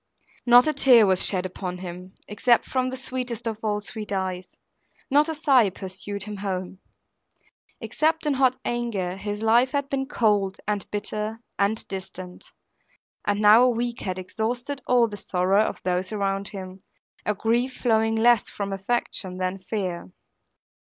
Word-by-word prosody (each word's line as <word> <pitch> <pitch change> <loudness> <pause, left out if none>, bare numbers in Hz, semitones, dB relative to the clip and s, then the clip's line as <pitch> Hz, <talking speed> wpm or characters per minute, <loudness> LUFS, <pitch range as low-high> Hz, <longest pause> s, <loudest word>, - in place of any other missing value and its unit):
Not 245 +1 +8
a 310 - +2
tear 250 -5 +6
was 190 -1 +4
shed 185 -2 +2
upon 180 0 -5
him, 180 +1 -9
except 230 +3 +2
from 255 -1 -1
the 260 - -5
sweetest 250 -3 -4
of 220 -2 -3
all 210 -1 0
sweet 215 -1 -6
eyes; 185 -2 -3 0.6
not 295 +3 +4
a 320 - -2
sigh 270 -8 +4
pursued 190 +1 -7
him 210 0 -7
home. 190 -1 -4 1.0
Except 320 +1 0
in 295 - +2
hot 260 -1 +2
anger, 220 -7 -2
his 205 +2 -5
life 240 +4 +4
had 280 -1 -1
been 270 -1 -2
cold, 205 -7 +1
and 210 -1 -2
bitter, 210 +1 -3 0.2
and 205 +3 0
distant; 185 -1 -8 0.8
and 205 0 +1
now 210 +3 +7
a 250 - +5
week 240 0 -2
had 185 -1 -3
exhausted 240 +8 -3
all 245 -2 +4
the 205 -2 -7
sorrow 190 +2 +2
of - - -3
those 180 +1 -1
around 195 -1 -1
him, 190 -2 -8 0.4
a 210 - -1
grief 235 +5 0
flowing 225 -2 +1
less 230 0 +4
from 200 -1 -4
affection 195 -2 -2
than 185 +1 -2
fear. 185 - -4
210 Hz, 160 wpm, -25 LUFS, 190-240 Hz, 1.0 s, Not